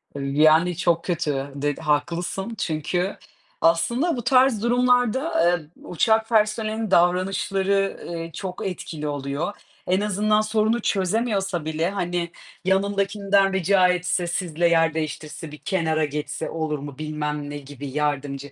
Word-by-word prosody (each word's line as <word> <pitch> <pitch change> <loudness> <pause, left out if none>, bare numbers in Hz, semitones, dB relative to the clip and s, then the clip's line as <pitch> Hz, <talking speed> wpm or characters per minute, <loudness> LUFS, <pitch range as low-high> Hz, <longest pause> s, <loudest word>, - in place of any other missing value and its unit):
Iıı, 140 -1 -4 0.2
yani 160 +2 +5
çok 170 -2 +1
kötü, 145 -5 -1
de 145 +1 -1
haklısın 170 +8 -1
çünkü 175 +2 -2 0.4
aslında 235 - +2
bu 240 - -4
tarz 255 -4 +4
durumlarda, 245 - +2
eee, 155 - -14 0.2
uçak 220 +5 +1
personelinin 215 -1 +1
davranışları, 195 +2 +2
ııı, 165 -1 -5
çok 190 +5 -6
etkili 160 -4 -5
oluyor. 145 +6 -3 0.3
En 185 +2 +2
azından 210 +1 +2
sorunu 215 +2 +1
çözemiyorsa 195 -3 0
bile, 160 +2 -1
hani, 175 -3 -2 0.3
yanındakinden 200 0 +2
rica 190 0 +4
etse, 180 0 0
sizle 170 -1 0
yer 165 -1 +3
değiştirse, 155 0 -5
bir 150 - -9
kenara 160 -3 0
geçse 150 +1 -4
olur 155 -2 -2
mu? 140 -1 -8
Bilmem 150 -1 -3
ne 145 - -5
gibi 145 0 -9
yardımcı 140 -1 -2
175 Hz, 130 wpm, -23 LUFS, 155-200 Hz, 0.4 s, yani